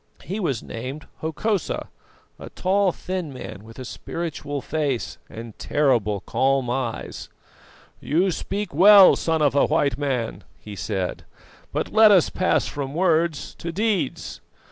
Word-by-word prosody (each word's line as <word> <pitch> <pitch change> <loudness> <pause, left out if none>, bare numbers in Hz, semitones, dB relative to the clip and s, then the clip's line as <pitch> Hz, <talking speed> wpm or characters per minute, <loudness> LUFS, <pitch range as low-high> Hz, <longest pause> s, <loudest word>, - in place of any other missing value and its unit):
He 195 +4 -4
was 140 - -1
named 130 +6 -7
Hokosa, 185 +5 -2 0.5
a - - -9
tall, 195 0 +1
thin 180 -3 -5
man, 115 -6 -8
with 115 +1 -14
a 130 - -7
spiritual 145 +1 -5
face 140 -3 -2
and 115 -1 -9
terrible 115 -9 +1
calm 135 -2 +1
eyes. 125 -3 -4 0.7
"'You 175 +6 +1
speak 200 +3 -4
well, 195 +4 +8
son 160 -2 0
of 145 - +3
a 140 - +3
White 145 -4 +1
Man,' 130 -6 -2
he 105 -1 -10
said, 95 0 -3 0.5
'but - - -3
let 220 0 +8
us 190 -5 +5
pass 185 - +1
from 140 -1 -5
words 170 -3 +1
to 170 - -4
deeds. 195 - -2
150 Hz, 140 wpm, -23 LUFS, 130-180 Hz, 0.7 s, well